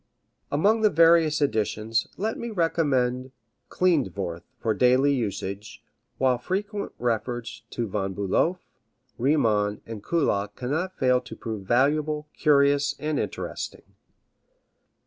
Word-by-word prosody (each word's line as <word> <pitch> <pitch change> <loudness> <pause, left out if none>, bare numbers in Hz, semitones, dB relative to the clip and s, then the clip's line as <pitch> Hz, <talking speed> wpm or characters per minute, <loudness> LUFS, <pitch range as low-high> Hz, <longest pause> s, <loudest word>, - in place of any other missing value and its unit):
Among 205 +10 +3
the 215 - +5
various 165 -3 +4
editions 110 -2 0
let 220 +3 -1
me 235 - -5
recommend 135 - 0 0.4
Klindworth 100 - 0 0.2
for 110 - 0
daily 130 +5 +4
usage, 105 -1 -4 0.3
while 130 -2 +2
frequent 200 - -3
reference 120 0 -2
to 120 -2 -3
Von 95 -1 -3
Bulow, 100 - +1 0.6
Riemann 110 -7 +2
and 110 -3 -8
Kullak 105 -11 0
cannot 160 +9 -3
fail 125 -1 +3
to 125 - -10
prove 110 -4 -6
valuable, 150 +5 +1
curious 140 -1 +3
and 150 -1 -2
interesting. - - -5
130 Hz, 110 wpm, -25 LUFS, 110-155 Hz, 0.6 s, the